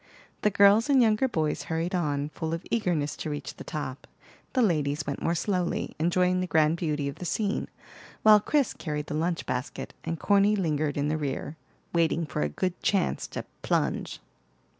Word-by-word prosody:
The 210 Hz, -, +4 dB
girls 200 Hz, +5 st, +5 dB
and 275 Hz, -2 st, +5 dB
younger 225 Hz, +1 st, +4 dB
boys 155 Hz, -10 st, -1 dB
hurried 165 Hz, +2 st, -2 dB
on, 145 Hz, -5 st, 0 dB
full 160 Hz, +1 st, -3 dB
of 165 Hz, -, -8 dB
eagerness 175 Hz, -10 st, 0 dB
to -, -, -4 dB
reach 145 Hz, -1 st, -5 dB
the -, -, -8 dB
top. 145 Hz, -3 st, -5 dB, 0.5 s
The 255 Hz, -, +3 dB
ladies 150 Hz, -6 st, +1 dB
went 140 Hz, -1 st, -4 dB
more 170 Hz, -, +1 dB
slowly, 180 Hz, 0 st, -1 dB
enjoying 180 Hz, +2 st, +2 dB
the 185 Hz, -, -2 dB
grand 160 Hz, 0 st, +3 dB
beauty 150 Hz, -4 st, -1 dB
of 140 Hz, -, -5 dB
the -, -, -7 dB
scene, 205 Hz, +3 st, -1 dB, 0.6 s
while 215 Hz, -1 st, +8 dB
Chris 280 Hz, +4 st, +1 dB
carried 150 Hz, -2 st, -4 dB
the -, -, -5 dB
lunch 165 Hz, +3 st, -1 dB
basket, 125 Hz, +2 st, -4 dB
and 165 Hz, -1 st, -3 dB
Corny 205 Hz, +1 st, +4 dB
lingered 155 Hz, -6 st, 0 dB
in 145 Hz, 0 st, +1 dB
the 155 Hz, +1 st, 0 dB
rear, 145 Hz, +1 st, -3 dB, 0.4 s
waiting 165 Hz, 0 st, +2 dB
for 140 Hz, -, -3 dB
a 75 Hz, -, +1 dB
good 180 Hz, -, -3 dB
chance 195 Hz, -3 st, +1 dB
to -, -, -6 dB, 0.2 s
"plunge." -, -, -1 dB
165 Hz, 185 wpm, -27 LUFS, 150-195 Hz, 0.6 s, while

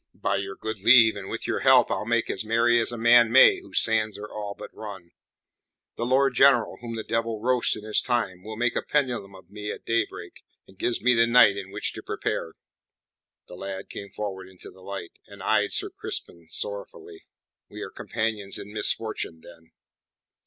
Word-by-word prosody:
"By 100 Hz, -, -1 dB
your 95 Hz, 0 st, -5 dB
good 110 Hz, 0 st, -5 dB
leave 115 Hz, 0 st, +7 dB
and 100 Hz, -1 st, -7 dB
with -, -, -5 dB
your -, -, -1 dB
help -, -, +5 dB
I'll 105 Hz, -, -2 dB
make 115 Hz, 0 st, +1 dB
as 95 Hz, -, -4 dB
merry 115 Hz, +2 st, +3 dB
as 115 Hz, -, 0 dB
a 120 Hz, -, -5 dB
man 120 Hz, 0 st, +5 dB
may 375 Hz, -, +7 dB
whose 375 Hz, -, 0 dB
sands 110 Hz, -2 st, +1 dB
are 105 Hz, +1 st, -7 dB
all 105 Hz, -1 st, -6 dB
but -, -, -10 dB
run. 95 Hz, -5 st, -9 dB, 0.8 s
The 120 Hz, -, -3 dB
Lord 135 Hz, +1 st, +3 dB
General 125 Hz, -4 st, +4 dB
whom 115 Hz, -1 st, -6 dB
the 110 Hz, -, -4 dB
devil 115 Hz, -1 st, -2 dB
roast 125 Hz, +2 st, +1 dB
in -, -, -10 dB
his 110 Hz, 0 st, +1 dB
time 120 Hz, -8 st, -1 dB
will 110 Hz, 0 st, -7 dB
make 120 Hz, 0 st, 0 dB
a -, -, 0 dB
pendulum 120 Hz, -9 st, -1 dB
of 95 Hz, +1 st, -17 dB
me 105 Hz, 0 st, -6 dB
at -, -, -9 dB
daybreak, 115 Hz, 0 st, -3 dB, 0.2 s
and 95 Hz, -, -20 dB
gives 120 Hz, -, -1 dB
me 125 Hz, +1 st, +4 dB
the 115 Hz, 0 st, +4 dB
night 115 Hz, -4 st, +6 dB
in 100 Hz, -1 st, -6 dB
which 100 Hz, +2 st, -3 dB
to -, -, -8 dB
prepare." 80 Hz, -, -3 dB, 0.9 s
The -, -, -12 dB
lad 95 Hz, +1 st, -7 dB
came 100 Hz, -, -8 dB
forward 95 Hz, -3 st, -6 dB
into 95 Hz, -1 st, -13 dB
the 95 Hz, -, -18 dB
light, 95 Hz, -2 st, -8 dB
and -, -, -12 dB
eyed -, -, +2 dB
Sir -, -, -2 dB
Crispin 85 Hz, -1 st, -7 dB
sorrowfully. 100 Hz, -1 st, -6 dB, 0.5 s
"We -, -, -8 dB
are -, -, -8 dB
companions 110 Hz, -3 st, -3 dB
in 105 Hz, -, -9 dB
misfortune, 110 Hz, -6 st, -2 dB
then." 80 Hz, -1 st, -16 dB
110 Hz, 195 wpm, -25 LUFS, 100-120 Hz, 0.9 s, leave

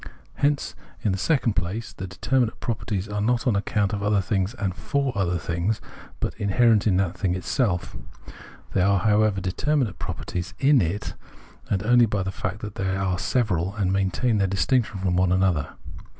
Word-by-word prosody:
Hence, 145 Hz, 0 st, +1 dB, 0.3 s
in 105 Hz, -, +2 dB
the 95 Hz, -, -1 dB
second 130 Hz, -, +2 dB
place, 95 Hz, +6 st, -3 dB
the 95 Hz, -, -6 dB
determmate 115 Hz, +6 st, 0 dB
properties 105 Hz, -4 st, -3 dB
are 105 Hz, 0 st, -3 dB
not 120 Hz, +2 st, +1 dB
on 120 Hz, -5 st, +2 dB
account 100 Hz, 0 st, 0 dB
of 100 Hz, -, -2 dB
other 105 Hz, 0 st, +2 dB
things 95 Hz, +2 st, -1 dB
and 95 Hz, -6 st, -2 dB
for 140 Hz, +5 st, -1 dB
other 90 Hz, -3 st, +1 dB
things, 85 Hz, +6 st, -1 dB, 0.4 s
but -, -, -2 dB
inherent 110 Hz, +1 st, +3 dB
in 95 Hz, -4 st, +3 dB
that 95 Hz, -2 st, 0 dB
thing 90 Hz, -1 st, 0 dB
itself. 95 Hz, 0 st, -1 dB, 0.8 s
They 95 Hz, -, +2 dB
are, 100 Hz, 0 st, +3 dB
however, 105 Hz, 0 st, +3 dB
determinate 110 Hz, -, 0 dB
properties 90 Hz, +3 st, -5 dB
in 140 Hz, -1 st, +4 dB
it 90 Hz, +4 st, -2 dB, 0.6 s
only 115 Hz, +5 st, +4 dB
by 100 Hz, -2 st, -1 dB
the 95 Hz, -, -3 dB
fact 95 Hz, +1 st, -4 dB
that 105 Hz, -1 st, -6 dB
they 95 Hz, 0 st, 0 dB
are 95 Hz, -2 st, -1 dB
several, 95 Hz, -7 st, 0 dB
and 95 Hz, -3 st, 0 dB
maintain 100 Hz, +4 st, +1 dB
their 100 Hz, -, +2 dB
distinction 105 Hz, +3 st, +1 dB
from 95 Hz, -1 st, 0 dB
one 90 Hz, 0 st, +3 dB
another. 95 Hz, -5 st, +1 dB
100 Hz, 175 wpm, -24 LUFS, 95-110 Hz, 0.8 s, in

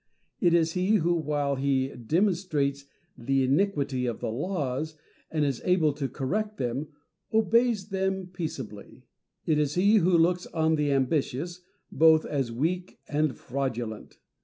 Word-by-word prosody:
It 175 Hz, -2 st, +4 dB
is 165 Hz, -1 st, +2 dB
he 185 Hz, +4 st, +2 dB
who, 175 Hz, -3 st, +2 dB
while 145 Hz, -4 st, -1 dB
he 135 Hz, -1 st, +1 dB
demonstrates 150 Hz, -, 0 dB, 0.3 s
the 135 Hz, +2 st, 0 dB
iniquity 140 Hz, -3 st, +1 dB
of 120 Hz, -, -3 dB
the -, -, -3 dB
laws, 150 Hz, -, -2 dB, 0.3 s
and 155 Hz, -2 st, 0 dB
is 135 Hz, -4 st, -2 dB
able 170 Hz, -5 st, +3 dB
to 140 Hz, -2 st, -3 dB
correct 210 Hz, +10 st, -2 dB
them, 130 Hz, +4 st, -2 dB, 0.4 s
obeys 220 Hz, -2 st, +2 dB
them 190 Hz, -1 st, -1 dB
peaceably. 155 Hz, -, -7 dB, 0.4 s
It 155 Hz, -2 st, +2 dB
is 150 Hz, -1 st, 0 dB
he 200 Hz, +5 st, +5 dB
who 180 Hz, -2 st, +4 dB
looks 175 Hz, +2 st, +2 dB
on 160 Hz, -1 st, +1 dB
the 150 Hz, -2 st, +1 dB
ambitious 145 Hz, +5 st, -1 dB, 0.3 s
both 160 Hz, +1 st, +5 dB
as 135 Hz, -5 st, -2 dB
weak 170 Hz, +9 st, -2 dB
and 150 Hz, -3 st, +1 dB
fraudulent. 120 Hz, -4 st, -4 dB
155 Hz, 140 wpm, -27 LUFS, 135-180 Hz, 0.4 s, he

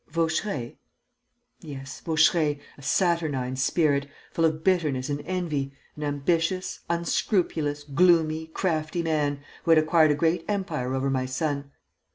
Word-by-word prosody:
"Vaucheray?" 160 Hz, -, -2 dB, 0.8 s
"Yes, 135 Hz, -3 st, -8 dB
Vaucheray, 160 Hz, -2 st, +3 dB, 0.2 s
a -, -, -15 dB
saturnine 150 Hz, -6 st, 0 dB
spirit, 140 Hz, +1 st, +1 dB, 0.2 s
full 165 Hz, -, +1 dB
of 160 Hz, 0 st, 0 dB
bitterness 150 Hz, -8 st, +1 dB
and 145 Hz, 0 st, -2 dB
envy, 155 Hz, -7 st, -2 dB, 0.2 s
an 150 Hz, -, -9 dB
ambitious, 165 Hz, +5 st, 0 dB
unscrupulous, 170 Hz, -3 st, 0 dB
gloomy, 160 Hz, +1 st, +3 dB
crafty 160 Hz, -1 st, -1 dB
man, 145 Hz, -3 st, 0 dB, 0.2 s
who -, -, -4 dB
had 165 Hz, -, +7 dB
acquired 155 Hz, 0 st, +4 dB
a 150 Hz, -, +3 dB
great 165 Hz, +3 st, +1 dB
empire 190 Hz, -11 st, -2 dB
over 135 Hz, +1 st, 0 dB
my 130 Hz, -1 st, 0 dB
son. 140 Hz, +1 st, -2 dB
155 Hz, 130 wpm, -26 LUFS, 140-170 Hz, 0.8 s, had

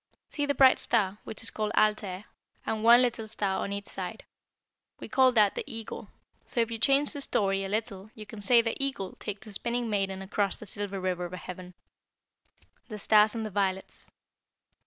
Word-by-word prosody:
"See 290 Hz, -1 st, -2 dB
the 285 Hz, -, 0 dB
bright 265 Hz, -1 st, +6 dB
star, 205 Hz, -3 st, 0 dB
which 220 Hz, -, -6 dB
is 225 Hz, -, +1 dB
called 215 Hz, -1 st, -2 dB
Altair, 210 Hz, -2 st, +1 dB, 0.4 s
and 220 Hz, -1 st, -2 dB
one 240 Hz, +2 st, +7 dB
little 230 Hz, -3 st, -1 dB
star 200 Hz, -3 st, -2 dB
on 200 Hz, -, -4 dB
each 200 Hz, 0 st, -4 dB
side. -, -, -7 dB, 0.7 s
We -, -, -7 dB
call 260 Hz, -1 st, +4 dB
that 210 Hz, -4 st, +4 dB
the -, -, -4 dB
Eagle, 225 Hz, -1 st, -7 dB, 0.4 s
so 245 Hz, -, -3 dB
if 230 Hz, 0 st, +1 dB
you 225 Hz, -, -4 dB
change 275 Hz, +4 st, +3 dB
the 285 Hz, -, -4 dB
story 195 Hz, -6 st, +1 dB
a 195 Hz, -, -4 dB
little 210 Hz, -1 st, -3 dB
you 215 Hz, -, -9 dB
can 215 Hz, 0 st, -10 dB
say 235 Hz, +3 st, +5 dB
the 230 Hz, +4 st, -2 dB
Eagle 230 Hz, -9 st, -3 dB
takes 205 Hz, 0 st, -6 dB
the 215 Hz, -, -10 dB
Spinning 235 Hz, +2 st, -2 dB
maiden 195 Hz, -2 st, -1 dB
across 200 Hz, 0 st, -1 dB
the -, -, -8 dB
Silver 200 Hz, 0 st, -2 dB
River 180 Hz, -1 st, -2 dB
of 175 Hz, -, -8 dB
Heaven." 180 Hz, 0 st, -9 dB, 1.1 s
THE 215 Hz, -, -7 dB
STARS 210 Hz, +1 st, +4 dB
AND 225 Hz, -1 st, -3 dB
THE 215 Hz, -, -5 dB
VIOLETS. 190 Hz, -1 st, -3 dB
215 Hz, 195 wpm, -28 LUFS, 195-230 Hz, 1.1 s, one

